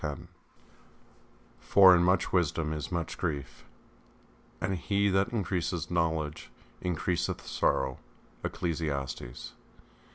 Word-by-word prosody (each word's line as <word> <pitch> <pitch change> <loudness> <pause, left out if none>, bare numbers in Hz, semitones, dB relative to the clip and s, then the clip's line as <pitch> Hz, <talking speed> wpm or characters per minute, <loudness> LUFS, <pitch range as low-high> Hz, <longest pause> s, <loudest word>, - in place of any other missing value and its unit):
X 75 -2 -3 1.4
For 95 -2 +7
in 85 - +3
much 90 +1 +2
wisdom 80 -3 +1
is 75 +2 -5
much 85 -2 -3
grief; 75 -8 -4 0.9
and 95 0 -1
he 100 +3 +1
that 95 +2 +2
increaseth 90 -6 -2
knowledge 80 -3 -1 0.3
increaseth 90 -1 -1
sorrow. 65 -1 0 0.4
ECCLESIASTES. 75 -8 -3
85 Hz, 95 wpm, -30 LUFS, 75-90 Hz, 1.4 s, For